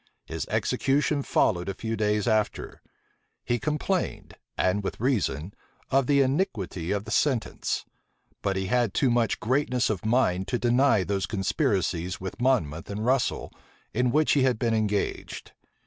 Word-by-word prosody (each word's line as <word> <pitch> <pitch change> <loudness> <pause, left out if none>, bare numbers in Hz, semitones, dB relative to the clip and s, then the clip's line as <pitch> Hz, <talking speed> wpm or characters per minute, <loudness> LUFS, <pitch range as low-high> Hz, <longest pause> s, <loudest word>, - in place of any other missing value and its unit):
His - - -5
execution 145 +1 +1
followed 90 -8 +1
a 100 - -3
few 115 +2 -3
days 105 0 0
after: 110 -2 -1 0.6
he 120 0 0
complained, 155 +7 -2 0.2
and 95 +2 +1
with - - -4
reason, 100 - 0 0.4
of 135 -1 +3
the 140 -1 +4
iniquity 110 - -1
of 100 0 -1
the 110 - -7
sentence; 125 -1 0 0.6
but 100 -1 0
he 95 0 -1
had 120 0 +1
too 130 - +3
much 120 -3 +1
greatness 125 -1 +1
of 100 - -4
mind 110 -5 +1
to 125 - 0
deny 120 -3 +3
those 100 +1 -1
conspiracies 95 - -1
with 95 +5 -6
Monmouth 85 - +1
and 105 +2 -3
Russel, 130 0 0 0.4
in 125 +2 +2
which 155 +3 +3
he 145 - +4
had 130 -3 +2
been 115 0 0
engaged. 105 -2 -2
110 Hz, 150 wpm, -26 LUFS, 100-130 Hz, 0.6 s, the